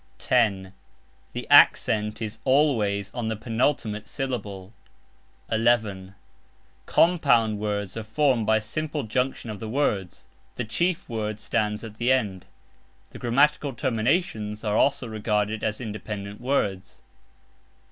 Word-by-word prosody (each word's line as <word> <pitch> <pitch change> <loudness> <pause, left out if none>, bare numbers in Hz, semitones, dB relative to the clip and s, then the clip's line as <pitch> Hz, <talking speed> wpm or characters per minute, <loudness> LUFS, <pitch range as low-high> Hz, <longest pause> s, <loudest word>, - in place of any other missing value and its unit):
(10) 100 -6 +1 0.6
The - - -4
ACCENT 105 +1 +5
is 110 +1 -5
ALWAYS 110 -8 +2
on 120 -3 -3
the 110 - -1
penultimate 110 -1 -1
syllable. 105 -7 -5 0.8
(11) 110 -5 +1 0.7
COMPOUND 135 -11 +3
WORDS 105 -2 -3
are 115 - -3
formed 115 0 +1
by 110 0 +4
simple 150 +7 -3
junction 125 0 -2
of 105 - -7
the 110 - -6
words 105 -8 -1 0.3
(the 125 - -3
chief 170 +10 -1
word 110 -2 -3
stands 105 0 -1
at 110 -1 -9
the 120 +2 +2
end); 105 -8 0 0.6
the - - -10
grammatical 140 +3 +2
terminations 115 - -1
are 105 -1 0
also 140 0 +2
regarded 110 -1 -1
as 110 -1 -1
independent 105 -2 -6
words. 105 -8 -2
110 Hz, 120 wpm, -25 LUFS, 105-125 Hz, 0.8 s, ACCENT